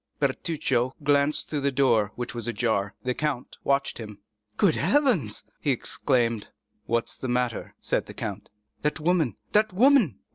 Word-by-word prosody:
Bertuccio 135 -3 0
glanced 145 +1 +2
through 150 - -2
the 140 0 +1
door, 120 -7 +3
which 120 -1 -4
was 120 -2 -4
ajar. 105 -3 0
The 125 0 0
count 145 -3 -3
watched 140 -2 +1
him. 105 -3 -8 0.4
"Good 185 -6 +4
heavens!" 245 - +2 0.2
he 145 - -1
exclaimed. 120 -3 0 0.4
"What 115 0 +1
is - - -6
the 130 - -5
matter?" 125 -2 -1
said - - -1
the - - -10
count. - - -5 0.3
"That 150 +2 0
woman—that 165 - +1
woman!" 230 - +5
135 Hz, 150 wpm, -26 LUFS, 115-155 Hz, 0.4 s, woman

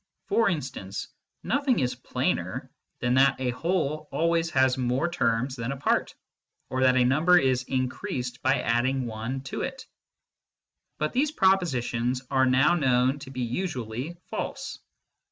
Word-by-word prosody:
For 230 -2 +3
instance, 125 - -4 0.3
nothing 280 -1 +1
is 125 -2 +1
plainer - - -2 0.3
than 120 0 +1
that 135 0 +4
a 130 -1 0
whole 155 +1 -1
always 170 0 +1
has 130 -4 +3
more 130 +5 0
terms 130 -6 0
than 115 0 -3
a 140 - -4
part, 140 - 0 0.6
or 130 - -1
that 130 0 +5
a 125 - +4
number 155 +8 +5
is 130 -5 +2
increased 130 -1 -3
by 130 +2 +2
add 120 +2 +2
ing 130 -1 -1
one 115 +4 -4
to 135 - -5
it. - - -5 1.1
But 155 - -1
these 280 +4 +2
propositions 130 - +1
are 130 -1 +4
now 130 +6 +4
known 130 -3 +2
to 140 -1 -9
be 130 -1 -5
usually 125 - -3
false. - - -4
130 Hz, 150 wpm, -27 LUFS, 125-155 Hz, 1.1 s, that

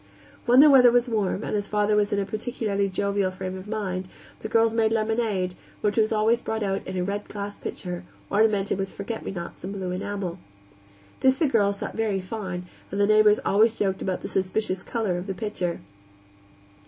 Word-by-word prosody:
When 250 +3 +8
the 300 - +8
weather 250 -3 +8
was 245 +1 +3
warm, 215 -3 -1
and - - -3
his 205 -1 -1
father 210 0 +2
was 210 0 +2
in 205 - +1
a 200 - 0
particularly 210 -2 -2
jovial 200 0 0
frame 185 0 -5
of 190 +2 -8
mind, 190 -4 -3 0.3
the - - -5
girls 225 0 +3
made 225 -1 +2
lemonade, 215 -4 0 0.3
which 210 -1 +1
was 220 -1 +2
always 225 +2 +2
brought 220 -1 -2
out 195 -1 -1
in 185 - -4
a 180 - 0
red 200 +2 -3
glass 205 0 -6
pitcher, 180 -1 -5 0.3
ornamented 205 -2 +2
with 195 0 -2
forget 220 +3 -5
me - - -4
nots 170 -3 -7
in 190 - -4
blue 190 -2 -4
enamel. 185 -1 -4 0.8
This 265 0 +4
the 320 - +2
girls 205 -7 +2
thought - - -5
very 215 -3 0
fine, 185 -2 -5 0.2
and 200 - -4
the 205 - +5
neighbors 215 0 +5
always 220 +3 +4
joked 190 -2 0
about 185 -1 -2
the - - -5
suspicious 190 0 -1
color 200 -4 -2
of 180 - -7
the 195 - -3
pitcher. 180 -4 -3
205 Hz, 200 wpm, -25 LUFS, 190-220 Hz, 0.8 s, When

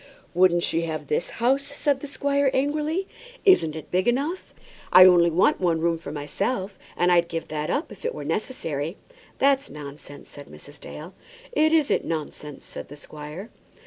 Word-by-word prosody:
"Wouldn't 175 -1 +4
she 165 - +1
have 160 -1 -4
this 475 +3 -1
house?" 265 - +1
said 285 0 -1
the 290 - -7
squire, 280 0 +1
angrily. 300 +7 0 0.4
"Isn't 165 - +5
it 155 - -9
big 185 +3 +1
enough? 285 +9 -1 0.4
I 185 - +10
only 175 -2 +6
want 170 +4 +2
one 170 -3 +2
room 165 0 0
for 145 - -8
myself, 185 - -3 0.2
and 175 0 +3
I'd 170 -1 +4
give 165 -1 -4
up - - -25
that 155 - -2
if - - -12
it 480 0 -2
were - - -6
necessary." 165 - -3 0.4
"That's 275 0 +2
nonsense," 145 -1 -10
said 145 -1 -11
Mrs. 145 0 -14
Dale. 160 +6 -9 0.4
"It 315 -9 +3
isn't 315 -3 +2
nonsense," 150 -2 -6
said - - -8
the 145 - -10
squire. 150 +8 -9
180 Hz, 175 wpm, -25 LUFS, -, 0.4 s, I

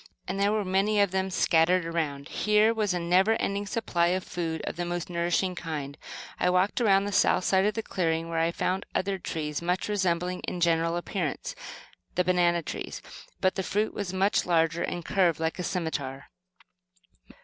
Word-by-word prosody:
And 190 +2 -3
there 200 +1 +3
were 215 -1 0
many 195 +3 +2
of 200 -2 +3
them 190 0 0
scattered 180 -1 +3
around. 155 -4 -2
Here 210 +1 +3
was 215 -3 0
a 180 - 0
never 180 +5 +3
ending 200 -1 -2
supply 175 -6 0
of 185 +1 0
food, 165 -3 -4
of - - -4
the 175 - -2
most 175 0 -4
nourishing 175 +2 0
kind. 150 -5 -5 0.4
I - - +3
walked 185 +6 +2
around 195 -3 +4
to 205 - -2
the 200 - -3
south - - +3
side 190 +1 +3
of 210 - +1
the 225 - -2
clearing, 165 -4 -1
where 165 -1 -2
I 165 +1 +2
found 185 +2 -2
other 195 0 0
trees, 150 -3 -3
much 180 +2 -1
resembling, 180 -3 0
in 180 - -3
general 165 0 +2
appearance, 175 -4 -3 0.6
the 180 - +3
banana 175 -1 +2
trees; - - -6 0.4
but 185 - +3
the - - -2
fruit 210 +3 -1
was 200 -3 -4
much 190 +2 +2
larger, 165 -1 +1
and 175 -2 -3
curved 180 -5 +2
like 160 +2 -2
a - - -2
scimitar. 145 -6 -3
180 Hz, 190 wpm, -27 LUFS, 165-195 Hz, 0.6 s, around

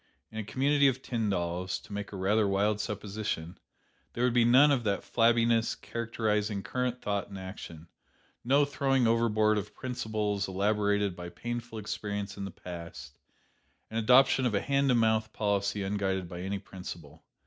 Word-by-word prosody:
In 110 - -5
a - - -2
community 140 +6 +3
of 130 0 0
Tyndalls 90 -6 -1
(to - - -11
make 100 0 -5
a - - -7
rather 100 +3 +2
wild 100 +2 +1
supposition), 105 -5 -4 0.5
there 120 - -1
would 125 -1 +3
be 120 -1 +5
none 130 +5 +6
of 130 -4 +1
that 100 -3 -1
flabbiness 115 0 +3
characterizing 105 -3 -2
current 125 -1 -2
thought 100 -1 -2
and 100 - -8
action 90 -4 -9 0.6
no 140 +4 +4
throwing 135 -2 +1
overboard 110 -2 +3
of 105 +1 -8
principles 110 -5 -2
elaborated 100 0 +1
by 90 0 -7
painful 120 +3 -5
experience 105 -2 -4
in 100 - -5
the - - -5
past, 85 -6 -9 0.7
and 110 - -1
adoption 130 +3 +5
of 110 - -1
a 100 - +1
hand 140 0 +1
to 125 - +4
mouth 110 -1 +2
policy 100 -1 0
unguided 95 -2 -1
by 90 +1 -7
any 95 +2 -2
principle. 85 -5 -10
105 Hz, 160 wpm, -30 LUFS, 100-120 Hz, 0.7 s, none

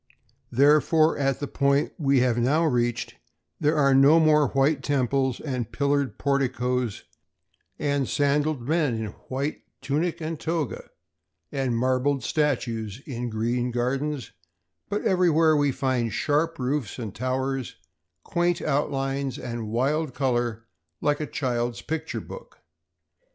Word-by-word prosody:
Therefore, 150 +4 +4
at 135 -2 +1
the 145 - -3
point 140 +1 +1
we 140 -4 +3
have 120 -2 +2
now 145 +7 +2
reached, 120 -4 0 0.5
there 150 +1 +2
are 140 -2 +4
no 140 +4 +6
more 150 -2 +4
white 135 +2 +2
temples 135 -2 0
and 125 -6 -4
pillared 140 +3 0
porticos 125 -4 -1 0.7
and 140 -2 0
sandaled 145 -1 +1
men 155 -6 +1
in 110 0 -3 0.2
white 140 +3 -2 0.2
tunic 155 +6 -1
and 160 -1 -4
toga, 160 -4 -3 0.6
and 130 -4 -1
marble 130 +3 +1
statues 120 -6 -1
in 125 -3 -4
green 120 +3 -1
gardens; 130 +4 -2 0.6
but 205 +1 -2
everywhere 165 -5 +4
we 145 -1 +2
find 130 -3 -1
sharp 160 +3 0
roofs 130 -2 -2
and 110 -6 -5
towers, 130 +1 -2 0.5
quaint 175 0 0
outlines, 135 -2 -1
and 115 -3 -5
wild 135 +5 0
color 120 -4 -1 0.3
like 145 -1 +1
a 150 - -3
child's 120 -3 -2
picture 160 0 -3
book. - - -11
135 Hz, 125 wpm, -25 LUFS, 125-150 Hz, 0.7 s, no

